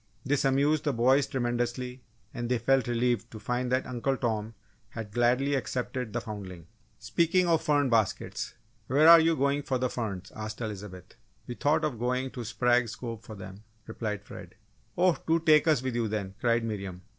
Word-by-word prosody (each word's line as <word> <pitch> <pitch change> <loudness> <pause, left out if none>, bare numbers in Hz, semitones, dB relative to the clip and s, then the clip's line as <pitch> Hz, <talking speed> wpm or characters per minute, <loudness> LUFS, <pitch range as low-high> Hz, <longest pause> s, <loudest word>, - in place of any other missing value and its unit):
This 140 0 +1
amused 140 +3 +2
the 145 - +1
boys 130 +4 +3
tremendously 120 0 -2 0.3
and 120 0 -4
they 125 - +2
felt 130 +3 +2
relieved 120 -2 0
to 110 - -9
find 125 +3 -2
that 130 +1 +1
Uncle 130 +2 -1
Tom 110 -2 -2 0.3
had 110 -3 -7
gladly 125 +5 +2
accepted 125 -3 -2
the 120 - -1
foundling. 100 -7 -8 0.3
"Speaking 175 +2 +1
of 165 -2 +3
fern 145 -3 +2
baskets 115 -5 -1 0.3
where 145 +5 +4
are 170 0 +11
you 165 0 +3
going 140 0 +1
for 130 -2 -1
the 125 0 -1
ferns?" 100 -6 -4
asked 110 0 -6
Elizabeth. 100 -5 -7 0.3
"We 125 - -5
thought 155 +5 +1
of 130 -7 -3
going 125 +2 -1
to 125 - -6
Sprague's 120 +1 +1
Cove 115 -3 -6
for 110 -1 -10
them," 95 +1 -10 0.2
replied 105 -3 -4
Fred. - - -11 0.4
"Oh, 180 -1 +3
do 165 +1 +3
take 155 -1 +4
us 150 -6 +3
with 130 -1 -2
you 115 -1 0
then," 100 -3 -3
cried 115 -1 +2
Miriam. 100 -5 -5
120 Hz, 180 wpm, -28 LUFS, 110-135 Hz, 0.4 s, are